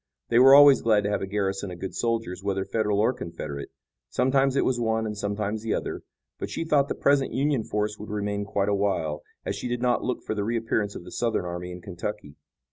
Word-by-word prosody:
They 120 Hz, -, +4 dB
were 135 Hz, +2 st, +9 dB
always 145 Hz, -2 st, +8 dB
glad 110 Hz, -2 st, +3 dB
to 100 Hz, -, -1 dB
have 105 Hz, -, 0 dB
a 95 Hz, -, -3 dB
garrison 95 Hz, -1 st, -2 dB
of 90 Hz, -, -7 dB
good 95 Hz, +2 st, -6 dB
soldiers 115 Hz, -6 st, -2 dB
whether 95 Hz, -1 st, -1 dB
Federal 105 Hz, -2 st, 0 dB
or 110 Hz, +4 st, +3 dB
Confederate 75 Hz, -, -6 dB, 0.4 s
sometimes 135 Hz, +1 st, +2 dB
it -, -, +2 dB
was 125 Hz, -2 st, +1 dB
one 110 Hz, -1 st, 0 dB
and 105 Hz, -1 st, -3 dB
sometimes 105 Hz, +1 st, -2 dB
the 115 Hz, -1 st, -1 dB
other. -, -, -4 dB, 0.4 s
But -, -, -4 dB
she -, -, -3 dB
thought 145 Hz, -3 st, +3 dB
the -, -, -3 dB
present 140 Hz, -1 st, +2 dB
Union 140 Hz, -3 st, +1 dB
force 105 Hz, 0 st, -2 dB
would 105 Hz, -, -8 dB
remain 105 Hz, -1 st, -2 dB
quite 100 Hz, 0 st, -1 dB
a -, -, +2 dB
while, 95 Hz, -7 st, 0 dB, 0.2 s
as -, -, -2 dB
she -, -, -4 dB
did 120 Hz, 0 st, -2 dB
not 125 Hz, -1 st, +2 dB
look 125 Hz, -, -2 dB
for -, -, -3 dB
the 105 Hz, -1 st, -2 dB
reappearance 115 Hz, -2 st, -1 dB
of -, -, -7 dB
the 90 Hz, -, -11 dB
Southern 115 Hz, -6 st, -1 dB
army 90 Hz, +1 st, -5 dB
in 90 Hz, 0 st, -8 dB
Kentucky. 95 Hz, -2 st, -6 dB
105 Hz, 230 wpm, -26 LUFS, 100-120 Hz, 0.4 s, were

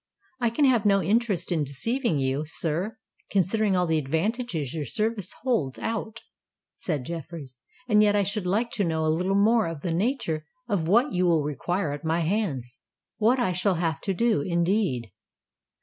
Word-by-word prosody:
"I 240 Hz, -2 st, +2 dB
can 255 Hz, +6 st, +2 dB
have 245 Hz, -5 st, +4 dB
no 195 Hz, -2 st, +3 dB
interest 215 Hz, -4 st, 0 dB
in 160 Hz, -4 st, +1 dB
deceiving 175 Hz, -, 0 dB
you, 135 Hz, +1 st, 0 dB
sir, 170 Hz, +8 st, -2 dB, 0.3 s
considering 200 Hz, +1 st, +2 dB
all 180 Hz, -1 st, +2 dB
the 160 Hz, -2 st, +1 dB
advantages 160 Hz, -, -2 dB
your 160 Hz, -2 st, -3 dB
service 210 Hz, -, -2 dB
holds 220 Hz, -, 0 dB
out," 225 Hz, 0 st, -4 dB, 0.5 s
said 150 Hz, -8 st, -3 dB
Jeffreys: 155 Hz, -5 st, -7 dB, 0.3 s
"and 210 Hz, -3 st, +5 dB
yet 205 Hz, -1 st, +4 dB
I 205 Hz, -, +3 dB
should 200 Hz, -1 st, -2 dB
like 225 Hz, +6 st, +1 dB
to 205 Hz, -, -1 dB
know 160 Hz, -2 st, 0 dB
a 155 Hz, -, +3 dB
little 185 Hz, +4 st, 0 dB
more 220 Hz, +2 st, +4 dB
of 165 Hz, -3 st, -6 dB
the 170 Hz, 0 st, -2 dB
nature 170 Hz, -, -1 dB, 0.2 s
of 195 Hz, -8 st, 0 dB
what 240 Hz, -, +3 dB
you 180 Hz, 0 st, +2 dB
will 165 Hz, -3 st, +3 dB
require 150 Hz, +4 st, -2 dB
at 145 Hz, 0 st, -6 dB
my 165 Hz, +1 st, +1 dB
hands—what 170 Hz, -, -2 dB
I 240 Hz, -7 st, +1 dB
shall 180 Hz, +2 st, +1 dB
have 165 Hz, -4 st, -1 dB
to 195 Hz, -, -1 dB
do, 230 Hz, -7 st, +2 dB
indeed." 170 Hz, -, 0 dB
180 Hz, 175 wpm, -26 LUFS, 155-220 Hz, 0.5 s, and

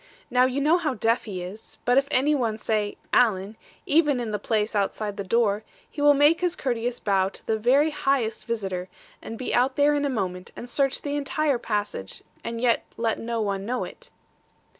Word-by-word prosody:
Now 250 Hz, +1 st, +5 dB
you 260 Hz, +2 st, -1 dB
know 320 Hz, +5 st, +4 dB
how 300 Hz, -6 st, -1 dB
deaf 225 Hz, +3 st, +1 dB
he 185 Hz, -5 st, -5 dB
is; 195 Hz, +5 st, -10 dB
but 245 Hz, -, +4 dB
if 275 Hz, +1 st, +3 dB
any 285 Hz, +4 st, +3 dB
one 230 Hz, -6 st, 0 dB
say, 210 Hz, -1 st, -1 dB, 0.2 s
"Alan," 210 Hz, -3 st, +3 dB, 0.3 s
even 295 Hz, -4 st, +3 dB
in 235 Hz, -3 st, -3 dB
the 210 Hz, -, -2 dB
place 215 Hz, +1 st, -1 dB
outside 205 Hz, +1 st, -1 dB
the 200 Hz, -, -4 dB
door, 210 Hz, +1 st, +1 dB, 0.2 s
he 295 Hz, -, -7 dB
will 290 Hz, 0 st, +6 dB
make 295 Hz, +4 st, +4 dB
his 355 Hz, -1 st, +1 dB
courteous 245 Hz, -2 st, -2 dB
bow 195 Hz, -2 st, +1 dB
to -, -, -11 dB
the 220 Hz, -1 st, 0 dB
very 275 Hz, +7 st, +4 dB
highest 270 Hz, -6 st, -1 dB
visitor, 190 Hz, -5 st, -3 dB, 0.3 s
and 225 Hz, -, -7 dB
be 255 Hz, -, -3 dB
out 255 Hz, +2 st, +2 dB
there 290 Hz, +1 st, +4 dB
in 290 Hz, 0 st, 0 dB
a 285 Hz, -, +1 dB
moment, 185 Hz, -7 st, -3 dB
and 245 Hz, -, -8 dB
search 275 Hz, +2 st, 0 dB
the 285 Hz, 0 st, -2 dB
entire 290 Hz, -2 st, 0 dB
passage, 205 Hz, -, -3 dB, 0.2 s
and 230 Hz, 0 st, -4 dB
yet 235 Hz, -1 st, +2 dB
let 230 Hz, -1 st, 0 dB
no 230 Hz, 0 st, -2 dB
one 200 Hz, -2 st, -1 dB
know 245 Hz, +4 st, -2 dB
it.' -, -, -10 dB
235 Hz, 205 wpm, -25 LUFS, 210-275 Hz, 0.3 s, will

